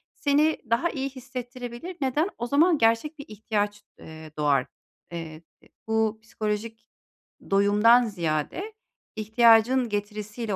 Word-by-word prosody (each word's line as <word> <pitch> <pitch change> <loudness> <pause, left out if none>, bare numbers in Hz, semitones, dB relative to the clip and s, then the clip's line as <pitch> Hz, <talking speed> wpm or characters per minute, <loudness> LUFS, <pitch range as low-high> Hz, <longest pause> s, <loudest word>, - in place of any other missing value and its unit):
seni 300 +2 +2
daha 235 +9 +2
iyi 275 -3 -3
hissettirebilir. 250 +4 -8
Neden? 290 +7 +1
O 240 - -3
zaman 315 +6 +4
gerçek 230 +6 +1
bir 285 - -8
ihtiyaç, 205 -1 -2 0.2
eee, 160 -1 -11
doğar. 145 -3 +2 0.5
Eee, 165 -2 -7 0.2
eee, - - -23 0.2
bu 220 0 0
psikolojik 220 +1 -4 0.6
doyumdan 210 +5 +5
ziyade 175 - -3 0.4
ihtiyacın 230 +3 +4
getirisiyle 210 +1 -4
225 Hz, 115 wpm, -26 LUFS, 205-260 Hz, 0.6 s, doyumdan